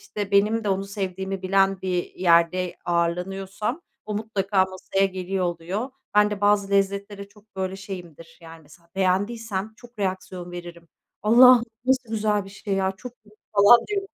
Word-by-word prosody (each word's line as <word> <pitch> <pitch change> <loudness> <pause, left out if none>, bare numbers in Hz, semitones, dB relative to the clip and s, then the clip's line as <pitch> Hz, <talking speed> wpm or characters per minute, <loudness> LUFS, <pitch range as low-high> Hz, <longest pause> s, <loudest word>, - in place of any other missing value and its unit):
İşte, 205 -1 -6
benim 210 +3 +2
de - - -1
onu 195 0 0
sevdiğimi 190 -1 -4
bilen 195 0 +2
bir 180 -2 -2
yerde 175 0 +2
ağırlanıyorsam 190 - -2 0.2
o 210 - -5
mutlaka 200 -3 0
masaya 190 +1 -1
geliyor 185 0 -3
oluyor. 175 +9 -3 0.2
Ben 210 0 +5
de 205 -1 -4
bazı 205 -1 +2
lezzetlere 200 0 -1
çok, 210 -1 -24
böyle, 190 0 -3
şeyimdir, 175 -5 -10
yani, 165 0 -12
mesela 170 +3 -20
beğendiysem 205 +2 -1
çok 240 -2 -17
reaksiyon 185 -2 -4
veririm. 175 -1 -9 0.3
"Allah'ım 240 +2 +7 0.2
nasıl 260 -2 +1
güzel 210 -2 0
bir 195 - -12
şey 195 0 -4
ya! 190 0 0
Çok 250 +4 -9
iyi." 210 0 -21 0.2
falan 205 +4 +8
diye 410 -1 0
195 Hz, 155 wpm, -24 LUFS, 185-210 Hz, 0.3 s, falan